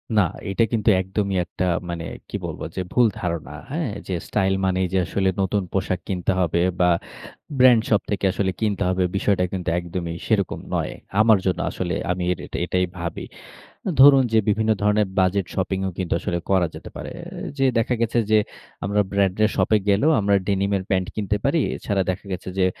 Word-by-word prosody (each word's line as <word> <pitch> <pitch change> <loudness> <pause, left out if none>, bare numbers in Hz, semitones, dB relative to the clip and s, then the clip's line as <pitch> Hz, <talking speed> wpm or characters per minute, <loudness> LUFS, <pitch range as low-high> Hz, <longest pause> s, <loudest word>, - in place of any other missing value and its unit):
না, 105 - +6 0.3
এটা 100 +4 +2
কিন্তু 110 -1 +2
একদমই 95 +1 -2
একটা 90 +2 -3 0.2
মানে, 85 -1 -4 0.2
কি - - -5
বলব - - -6
যে 95 - -1
ভুল 125 -2 +4
ধারণা। 85 -5 -3 0.2
হ্যাঁ? 155 -3 -1 0.2
যে 95 - -2
স্টাইল 95 -2 +1
মানেই 95 0 +1
যে - - +3
আসলে 95 +3 0
নতুন 95 +1 0
পোশাক 95 -1 0
কিনতে 90 -1 -1
হবে 85 -1 +1 0.2
বা 90 0 +4 0.7
ব্র্যান্ড 125 -3 +7
শপ 105 -2 +3
থেকে 100 -1 0
আসলে 95 -1 0
কিনতে 105 -3 0
হবে। 95 0 +1
বিষয়টা 95 -1 +2
কিন্তু 90 -2 -2
একদমই 85 -1 -4
সেরকম 100 -5 0 0.2
নয়। - - -1 0.3
আমার 110 -1 +6
জন্য 90 -2 +1
আসলে 90 -2 -3 0.2
আমি 90 0 -2
এট - - -11
এট - - -17
এটাই 90 +1 +1
ভাবি। 85 -1 -4 0.7
ধরুন 135 -1 +8
যে, - - +5
বিভিন্ন 110 +1 +2
ধরণের 105 0 +3
বাজেট 95 0 +2
শপিং 95 0 -1
ও - - -1
কিন্তু 95 -2 -1
আসলে 85 - -2
করা 95 -3 +3
যেতে - - -9
পারে। - - -6
এ - - -10 0.3
যে 135 - +2
দেখা 115 +2 +1
গেছে 115 +1 0
যে, 110 - +6 0.5
আমরা 100 +1 +2
ব্র্যান্ডের 100 +2 +2
শপ - - +1
এ - - +6
গেলেও 105 +11 +4
আমরা 100 -1 +3
ডেনিমের 100 -1 +1
প্যান্ট 95 -1 +1
কিনতে 105 -1 -1
পারি। 150 +4 +2 0.2
এছাড়া 100 -2 -1
দেখা 95 +3 -8
গেছে 90 0 -4
যে 90 - +4
95 Hz, 190 wpm, -23 LUFS, 90-105 Hz, 0.7 s, ধরুন